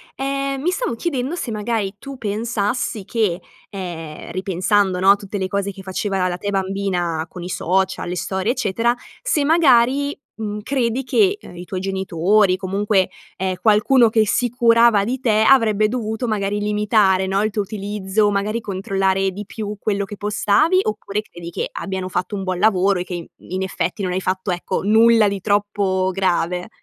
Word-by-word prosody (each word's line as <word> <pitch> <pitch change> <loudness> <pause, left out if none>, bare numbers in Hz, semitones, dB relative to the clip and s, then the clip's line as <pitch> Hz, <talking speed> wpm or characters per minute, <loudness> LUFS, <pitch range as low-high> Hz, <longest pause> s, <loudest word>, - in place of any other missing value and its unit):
Ehm, 275 0 -2
mi 355 +4 +1
stavo 375 - -2
chiedendo 275 +2 -2
se 250 - -4
magari 210 -2 -2
tu 275 -1 -8
pensassi 215 0 -2
che, 205 -6 0 0.3
ehm, 170 -6 -7
ripensando 185 +1 +1
no 190 +1 +6
a - - +6
tutte 200 0 -6
le 190 -1 -1
cose 200 +1 -2
che 195 0 -11
faceva 190 0 -1
la 180 -1 -2
te 205 - -4
bambina 190 -4 -1
con 180 - -9
i 180 - -6
social, 190 +2 0
le 180 - -3
storie 190 +4 -1
eccetera 235 -1 +1 0.3
se 320 -12 +1
magari, 280 -3 +3 0.2
mhmm, 210 -1 -4
credi 255 0 -1
che, 400 - +2
uhm, - - -12
i 175 - -7
tuoi 185 +1 -4
genitori 190 +1 +2
comunque, 195 0 +1 0.3
ehm, 190 0 -1
qualcuno 225 +3 +4
che 220 -1 +3
si 245 +3 +1
curava 230 -3 +4
di 255 +4 -2
te, 220 -3 +3
avrebbe 215 -5 +4
dovuto 220 0 -3
magari 205 -1 -1
limitare, 210 -2 +2
no, 195 +1 +1
il 215 - 0
tuo 205 0 -1
utilizzo, 205 0 -1
magari 205 +3 -1
controllare 195 -1 0
di 205 +2 -7
più 210 0 -6
quello 200 -1 -1
che 205 +1 -9
postavi? 210 - +2
Oppure 210 -1 -3
credi 175 -5 -10
che - - -3
abbiano 190 -1 -4
fatto 185 +3 -2
un 195 - -4
buon 185 -1 -2
lavoro 195 -2 +3
e - - -2
che 180 - -8
i 170 -2 -5 0.3
in 185 - -1
effetti 185 +1 -3
non 180 - -1
hai 185 - -1
fatto 185 +1 -2
ecco, 175 +2 -2
nulla 225 +1 +5
di 200 0 -2
troppo 200 -2 +1
grave. 180 0 0
205 Hz, 180 wpm, -20 LUFS, 190-225 Hz, 0.3 s, no